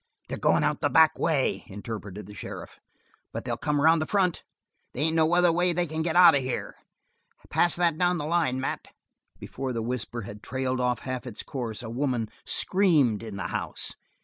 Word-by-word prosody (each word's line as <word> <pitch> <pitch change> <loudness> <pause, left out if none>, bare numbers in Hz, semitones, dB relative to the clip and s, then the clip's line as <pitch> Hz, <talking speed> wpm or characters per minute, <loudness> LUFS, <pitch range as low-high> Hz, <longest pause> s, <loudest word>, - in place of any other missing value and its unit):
"They're - - -4
goin' - - +3
out - - 0
the - - +2
back 160 -1 +5
way," 150 -5 +1
interpreted 105 -1 -7
the 105 - -11
sheriff, 100 - -8 0.5
"but - - -6
they'll - - -1
come 150 -1 -1
around 160 +2 +5
in 155 - -2
front. 185 -4 +1 0.5
They 130 - -3
ain't 160 +1 +2
any 160 +1 +3
other 175 0 +4
way 175 +1 +2
they 175 +1 0
can 160 0 -3
get 160 0 -1
out 175 -2 +8
of 140 - +2
here. 130 -1 -4 0.8
Pass 175 - +3
that 170 -2 +1
down 180 0 +2
the 150 - -3
line, 155 -6 +1
Mat." 130 - -3 0.5
Before 130 -2 -5
the 115 -1 -2
whisper 120 0 -4
had 105 0 -9
trailed 130 +1 -2
out 125 -1 0
half 130 0 -5
its 115 - -4
course, 120 -3 -5
a 110 - -6
woman 125 -3 -1 0.2
screamed 155 - +3
in 110 -3 -7
the - - -4
house. - - -3
140 Hz, 200 wpm, -27 LUFS, 120-165 Hz, 0.8 s, out